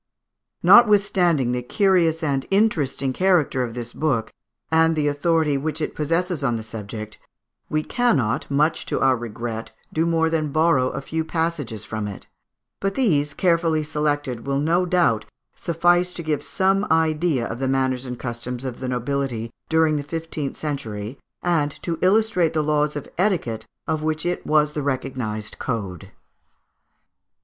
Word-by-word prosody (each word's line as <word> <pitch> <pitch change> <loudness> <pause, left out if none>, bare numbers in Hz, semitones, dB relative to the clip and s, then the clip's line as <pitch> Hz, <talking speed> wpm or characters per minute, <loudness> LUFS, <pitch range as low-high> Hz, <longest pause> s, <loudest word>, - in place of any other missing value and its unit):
Notwithstanding 195 - +5
the 125 0 -1
curious 170 - +2
and 140 -3 0
interesting 155 -10 +1
character 175 -6 +2
of 115 -1 -5
this 120 -1 -6
book, 130 -8 -1 0.4
and 160 0 +4
the 150 -1 +1
authority 150 0 +1
which 155 +2 -3
it 155 - -2
possesses 165 +1 -1
on 120 -4 +1
this 110 - -7
subject, 110 -1 -7 0.5
we 155 0 0
cannot, 140 - +1
much 150 +3 +1
to - - -1
our 135 -1 +4
regret, 115 -1 -5 0.2
do 165 +1 +1
more 165 -1 +2
than 155 -2 -1
borrow 155 -4 +3
a - - -5
few 160 +3 -2
passages 160 - -2
from 110 -1 -4
it; 100 - -8 0.5
but 195 0 -1
these, 150 - +1
carefully 165 -3 +2
selected, 145 -5 -2
will 140 0 +1
no 170 +5 +2
doubt 170 -12 +2 0.3
suffice 175 +2 +2
to 170 - -6
give 155 -2 -1
some 195 +1 +1
idea 160 -4 +2
of 115 - -5
the 135 - 0
manners 130 -1 0
and 125 -2 -6
customs 120 +1 -5
of 125 -2 -5
the 130 - -3
nobility 125 -2 -2 0.2
during 160 -1 +3
the 145 - -3
fifteenth 160 -2 -4
century, 120 -6 -5 0.2
and 165 -5 +2
to 165 -2 -2
illustrate 185 -4 +3
the 155 -1 +1
laws 150 0 +1
of 145 - -5
etiquette 125 - 0 0.2
of 160 -1 -1
which 155 +1 -1
it 175 0 -2
was 150 -1 +3
the 150 - -2
recognised 130 -6 -3
code. 100 - -4
150 Hz, 155 wpm, -23 LUFS, 125-165 Hz, 0.5 s, Notwithstanding